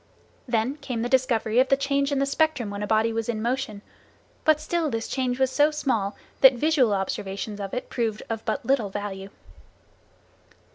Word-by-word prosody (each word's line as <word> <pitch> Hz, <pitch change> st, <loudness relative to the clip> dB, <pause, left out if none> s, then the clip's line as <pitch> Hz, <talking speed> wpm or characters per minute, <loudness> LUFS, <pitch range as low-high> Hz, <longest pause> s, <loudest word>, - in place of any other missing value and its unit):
Then 240 Hz, +4 st, 0 dB
came 250 Hz, -6 st, -4 dB
the 240 Hz, -, -2 dB
discovery 240 Hz, -3 st, +2 dB
of 260 Hz, -, +3 dB
the 275 Hz, -, +4 dB
change 280 Hz, 0 st, 0 dB
in 280 Hz, -, +1 dB
the 275 Hz, -, +2 dB
spectrum 280 Hz, -6 st, 0 dB
when 200 Hz, 0 st, -5 dB
a 205 Hz, -, -2 dB
body 220 Hz, +1 st, +2 dB
was 225 Hz, 0 st, -2 dB
in 225 Hz, -2 st, -1 dB
motion, 235 Hz, -3 st, -2 dB, 0.6 s
but 310 Hz, -1 st, +5 dB
still 320 Hz, 0 st, -1 dB
this 225 Hz, -3 st, -3 dB
change 255 Hz, -1 st, -1 dB
was 265 Hz, -1 st, +2 dB
so 295 Hz, +2 st, +4 dB
small 230 Hz, -10 st, -1 dB, 0.2 s
that 265 Hz, -1 st, +8 dB
visual 265 Hz, -2 st, +2 dB
observations 200 Hz, +1 st, -3 dB
of 195 Hz, -1 st, -5 dB
it 250 Hz, -, -4 dB
proved 225 Hz, -4 st, -2 dB
of 225 Hz, -1 st, -4 dB
but 220 Hz, -, -2 dB
little 245 Hz, -5 st, +1 dB
value. 195 Hz, -1 st, -5 dB
240 Hz, 185 wpm, -25 LUFS, 215-275 Hz, 0.6 s, that